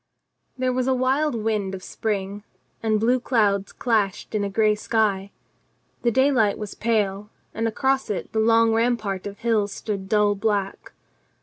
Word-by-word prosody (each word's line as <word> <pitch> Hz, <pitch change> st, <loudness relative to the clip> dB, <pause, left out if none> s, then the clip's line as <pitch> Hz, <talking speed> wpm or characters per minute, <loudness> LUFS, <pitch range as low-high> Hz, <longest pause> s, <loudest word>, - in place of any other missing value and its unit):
There 255 Hz, 0 st, 0 dB
was 255 Hz, 0 st, 0 dB
a 260 Hz, -, +3 dB
wild 265 Hz, +3 st, +1 dB
wind 210 Hz, -3 st, -1 dB
of 185 Hz, -, -10 dB
spring, 205 Hz, -1 st, -3 dB, 0.4 s
and 215 Hz, -1 st, +1 dB
blue 245 Hz, +4 st, +2 dB
clouds 205 Hz, -6 st, +1 dB
clashed 215 Hz, -5 st, -1 dB
in 210 Hz, -1 st, 0 dB
a 200 Hz, -, -1 dB
gray 215 Hz, +1 st, +3 dB
sky. 210 Hz, -2 st, 0 dB, 0.7 s
The 240 Hz, -, +2 dB
daylight 245 Hz, -4 st, +3 dB
was 210 Hz, -2 st, -6 dB
pale, 210 Hz, -3 st, -1 dB, 0.2 s
and 225 Hz, +1 st, -1 dB
across 265 Hz, +3 st, 0 dB
it 205 Hz, -, -4 dB
the 220 Hz, -, +1 dB
long 225 Hz, 0 st, +4 dB
rampart 225 Hz, -5 st, 0 dB
of 200 Hz, 0 st, -8 dB
hills 215 Hz, -3 st, 0 dB
stood 195 Hz, -2 st, -5 dB
dull 210 Hz, -1 st, +3 dB
black. 200 Hz, -1 st, -2 dB
215 Hz, 160 wpm, -23 LUFS, 200-235 Hz, 0.7 s, long